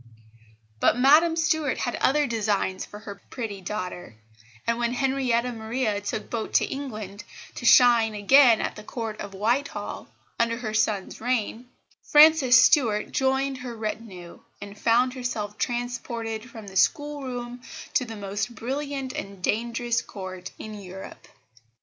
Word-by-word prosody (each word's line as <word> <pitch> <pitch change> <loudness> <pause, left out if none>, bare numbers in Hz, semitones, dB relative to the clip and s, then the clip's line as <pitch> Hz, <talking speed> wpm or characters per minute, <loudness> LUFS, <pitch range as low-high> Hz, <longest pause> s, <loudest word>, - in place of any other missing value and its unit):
But - - +3
Madame 305 +6 +5
Stuart 315 -3 +1
had 245 - -2
other 295 +2 +3
designs 210 -5 -1
for 205 - -10
her 200 -2 -9
pretty 215 -6 -5
daughter; 180 - -5 0.5
and 230 0 0
when 240 0 0
Henrietta 250 -2 +1
Maria 220 -2 -2
took 205 +1 -4
boat 225 -2 -4
to - - +5
England 215 -7 -6 0.3
to 240 - -3
shine 235 -4 +6
again 235 +3 +6
at - - -3
the - - -9
Court 220 -1 -5
of 200 -1 -7
Whitehall, 240 +8 -2 0.3
under 230 0 +1
her 220 -3 -4
son's 215 -2 -1
reign, 245 0 -2 0.3
Frances 295 -4 +7
Stuart 245 -5 +3
joined 265 0 0
her 245 -2 -7
retinue, 215 -5 -6 0.2
and 200 0 -9
found 240 +4 +2
herself 225 -5 -4
transported 240 -1 -3
from 225 -2 -10
the 190 -1 -11
schoolroom 250 -2 -1 0.3
to - - +2
the 225 -2 -7
most 205 +3 -4
brilliant 270 +2 -4
and 195 -2 -7
dangerous 235 +2 0
court 185 -2 -8
in 215 - -8
Europe. 190 -2 -10
235 Hz, 140 wpm, -25 LUFS, 210-255 Hz, 0.5 s, Frances